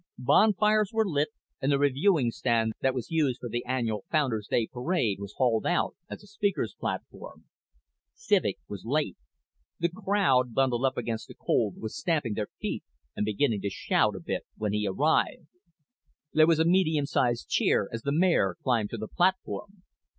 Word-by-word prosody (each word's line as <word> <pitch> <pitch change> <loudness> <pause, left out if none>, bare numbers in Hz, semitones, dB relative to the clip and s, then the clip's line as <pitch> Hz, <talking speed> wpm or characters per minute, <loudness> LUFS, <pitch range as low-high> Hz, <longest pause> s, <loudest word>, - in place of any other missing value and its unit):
Bonfires 210 - +3
were 220 -1 +2
lit 150 -4 +1 0.3
and 135 - +1
the 140 - +3
reviewing 145 -1 +2
stand 115 -1 0
that 130 -1 +1
was 125 +3 -5
used 145 -6 +1
for 120 - -6
the 120 +2 -2
annual 115 -5 -1
Founders' 125 -10 0
Day 115 - +2
parade 125 - -1
was 100 0 -8
hauled 120 -4 +2
out 175 - 0
as - - -8
a - - -14
speaker's 205 -1 -1
platform. - - -6 0.7
Civek 205 - +1
was 100 -2 -7
late. 140 -4 -1 0.6
The 170 - +1
crowd, 175 - +1
bundled 130 -1 +2
up 130 - 0
against 115 -2 -3
the - - -12
cold, 105 -6 0
was 110 - -6
stamping 150 -7 0
their 105 -1 -3
feet - - -3 0.3
and 105 - -1
beginning 110 0 +1
to 100 - -1
shout 95 - +1
a - - -5
bit - - -4
when 105 -1 -2
he 105 0 0
arrived. 150 - +1 0.9
There 155 0 +6
was 165 -2 +4
a 160 - +3
medium 160 -4 +3
sized 120 - 0
cheer 95 - +2
as 115 - -4
the 140 - -2
mayor 155 - +2
climbed 115 -5 +1
to 115 - -5
the 110 0 -5
platform. 190 - -1
130 Hz, 175 wpm, -28 LUFS, 115-170 Hz, 0.9 s, There